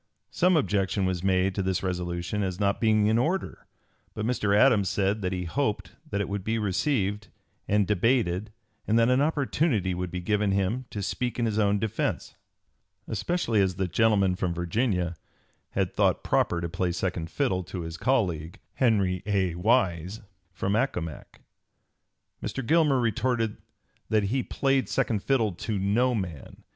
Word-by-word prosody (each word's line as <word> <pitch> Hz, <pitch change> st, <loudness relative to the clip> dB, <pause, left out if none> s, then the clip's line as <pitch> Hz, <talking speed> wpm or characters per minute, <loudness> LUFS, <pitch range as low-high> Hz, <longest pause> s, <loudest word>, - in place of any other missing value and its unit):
Some 180 Hz, -1 st, +3 dB
objection 100 Hz, -7 st, +1 dB
was 90 Hz, -1 st, -1 dB
made 95 Hz, 0 st, +2 dB
to 100 Hz, -, -1 dB
this 95 Hz, -1 st, -1 dB
resolution 90 Hz, +2 st, -2 dB
as 95 Hz, -2 st, -2 dB
not 100 Hz, -1 st, +1 dB
being 110 Hz, -2 st, +3 dB
in 110 Hz, +2 st, +3 dB
order; 175 Hz, +9 st, -2 dB, 0.5 s
but 110 Hz, -, -3 dB
Mr. 105 Hz, -4 st, +1 dB
Adams 105 Hz, -5 st, +4 dB
said 100 Hz, +2 st, 0 dB
that 90 Hz, -1 st, -1 dB
he 90 Hz, -1 st, -2 dB
hoped 100 Hz, -2 st, -2 dB, 0.2 s
that 100 Hz, -, -2 dB
it 100 Hz, -, -1 dB
would 100 Hz, -1 st, -3 dB
be 110 Hz, +3 st, -1 dB
received 105 Hz, 0 st, 0 dB, 0.4 s
and 105 Hz, 0 st, +3 dB
debated 105 Hz, -1 st, +1 dB, 0.4 s
and 110 Hz, -, +3 dB
that 115 Hz, +1 st, +4 dB
an 130 Hz, +2 st, +3 dB
opportunity 145 Hz, -, +1 dB
would 90 Hz, 0 st, -3 dB
be 90 Hz, -, -4 dB
given 105 Hz, +2 st, +1 dB
him 100 Hz, +7 st, 0 dB
to 105 Hz, -, -5 dB
speak 125 Hz, +5 st, -2 dB
in 120 Hz, -, +1 dB
his 110 Hz, -1 st, 0 dB
own 100 Hz, -1 st, +3 dB
defence; 110 Hz, 0 st, -2 dB, 0.7 s
"especially 115 Hz, -, 0 dB
as 95 Hz, -2 st, +1 dB
the 95 Hz, 0 st, -1 dB
gentleman 100 Hz, 0 st, +2 dB
from 90 Hz, -2 st, -2 dB
Virginia 90 Hz, 0 st, -1 dB, 0.6 s
had -, -, 0 dB
thought -, -, +2 dB
proper 85 Hz, -, +1 dB
to 85 Hz, -, -2 dB
play 90 Hz, +1 st, -1 dB
second 85 Hz, -2 st, -3 dB
fiddle 125 Hz, -10 st, 0 dB
to 90 Hz, -, -6 dB
his 80 Hz, -1 st, -6 dB
colleague 90 Hz, -, 0 dB, 0.2 s
from 115 Hz, -6 st, +3 dB, 1.7 s
Accomac." 90 Hz, -, -3 dB, 1.0 s
Mr. 135 Hz, -, -4 dB
Gilmer 150 Hz, -2 st, +3 dB
retorted 115 Hz, -1 st, 0 dB, 0.5 s
that 110 Hz, -2 st, +2 dB
he 120 Hz, +7 st, 0 dB
"played 135 Hz, +1 st, 0 dB
second 115 Hz, -6 st, 0 dB
fiddle 115 Hz, -5 st, +1 dB
to 100 Hz, +4 st, -4 dB
no 115 Hz, +6 st, +2 dB
man. 85 Hz, -9 st, -6 dB
105 Hz, 155 wpm, -27 LUFS, 95-120 Hz, 1.7 s, Adams